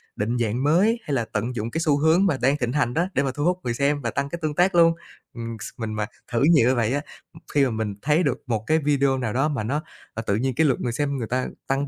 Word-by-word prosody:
định 115 +4 -1
dạng 120 +2 -1
mới, 190 +11 +3
hay 145 - -4
là 120 -4 0
tận 115 +4 -2
dụng 115 0 -3
cái 165 - -2
xu 150 -3 +3
hướng 160 +6 +4
mà 160 -9 +1
đang 135 +3 +3
thịnh 125 -4 -1
hành 140 -5 +1
đó 170 +5 +1
để 140 - +1
mà 135 - -1
thu 145 - -2
hút 180 +1 +1
người 120 - -1
xem 145 +3 0
và 115 -3 -2
tăng 140 +3 -2
cái 170 - -5
tương 155 -1 -1
tác 180 +2 +3
luôn. 165 -1 +6 0.4
Ừm, 115 -1 -6
s - - -5
mình 110 -3 -4
mà 105 0 -1 0.3
thử 120 +2 +1
nhiều 140 -7 +5
như 130 - +2
vậy 115 0 +1
á, 145 - 0 0.3
ừm, - - -13
khi 145 -2 +4
mà 130 - -1
mình 110 -2 -2
thấy 150 +5 +2
được 135 -5 0
một 110 -3 -1
cái 155 - +3
video 140 -2 +2
nào 120 -5 -2
đó 135 +4 +2
mà 140 -7 -2
nó, 140 +8 -1 0.3
à, 115 - -4
tự 100 - +2
nhiên 130 +4 0
cái 160 - +3
lượt 135 -4 +1
người 120 - -1
xem 140 +3 -1
người 115 -4 -3
ta 125 +2 -1 0.2
tăng 135 +1 0
135 Hz, 300 wpm, -24 LUFS, 120-150 Hz, 0.4 s, luôn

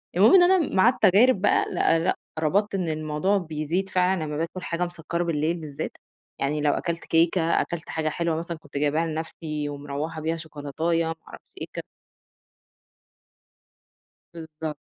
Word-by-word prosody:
المهم 200 +5 +6
إن 365 - +8
أنا 355 -3 +3
مع 190 +5 +6
التجارب 215 -1 +4
بقى 205 - +3
لأ، 165 - +3
لأ، 170 +3 +1 0.2
ربطت 195 +7 +1
إن 180 -4 -1
الموضوع 155 +5 0
بيزيد 165 +2 -2
فعلًا 185 -2 +1
لمّا 150 -1 -4
باكل 165 +3 -3
حاجة 170 +1 -1
مسَكَّرة 170 0 -3
بالليل 165 0 0
بالذات، 150 -4 -6 0.4
يعني 145 +2 0
لو 145 -1 +3
أكلت 170 -1 -3
كيكة، 165 +2 +3 0.2
أكلت 170 -2 -5
حاجة 160 -1 -1
حلوة 170 +1 -1
مثلًا 170 +1 -4
كنت 145 -2 -9
جايباها 150 +3 +1
لنفْسي 155 -2 -4
ومرَوَّحة 145 +2 -5
بيها، 165 +1 -1
شوكولاتية 160 +2 -2
ما 165 - -3
أعرفش - - -13
إيه - - -4
ك - - -5 2.5
بالضبط. 160 -2 -6
165 Hz, 155 wpm, -25 LUFS, 155-180 Hz, 2.5 s, إن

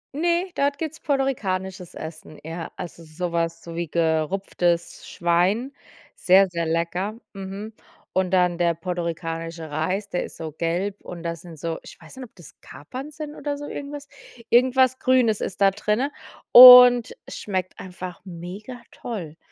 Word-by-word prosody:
Ne, 345 +4 0
dort 280 0 0
gibt’s 320 +1 -5
puertorikanisches 190 - -2
Essen, 155 -1 -9
ja. 165 +1 -6
Also 170 -1 -8
so 170 +3 -5
was 165 0 -2
so 170 -1 -9
wie 170 0 -3
gerupftes 170 +2 -1
Schwein, 180 +9 +1 0.4
sehr, 190 +1 +5
sehr 170 -1 -3
lecker. 170 +5 -2 0.2
Mhm. 195 +2 -7 0.4
Und 185 -1 0
dann 180 -2 +2
der 170 -1 +2
puertorikanische 165 -1 -5
Reis, 185 +7 -2
der 180 - -2
ist - - -12
so 160 -1 -6
gelb, 175 +6 -2
und 170 -1 -9
das 170 -1 -4
sind 170 -3 -12
so 165 +2 -4
ich - - -13
weiß 160 +10 -15
nicht, 260 - -7
ob 225 - -21
das 175 -5 -16
Kapern 260 - -9
sind 300 0 -8
oder 285 0 -4
so 290 0 -7
irgendwas. 285 0 -7 0.4
Irgendwas 260 +1 +4
Grünes 250 -5 +3
ist 190 - -5
da 195 0 +6
drinne, 215 +8 -1 0.4
und 250 -1 +10
es - - -8
schmeckt 185 -3 -4
einfach 180 -1 -8
mega 190 +8 -9
toll, 175 -10 -7
185 Hz, 155 wpm, -23 LUFS, 170-245 Hz, 0.4 s, und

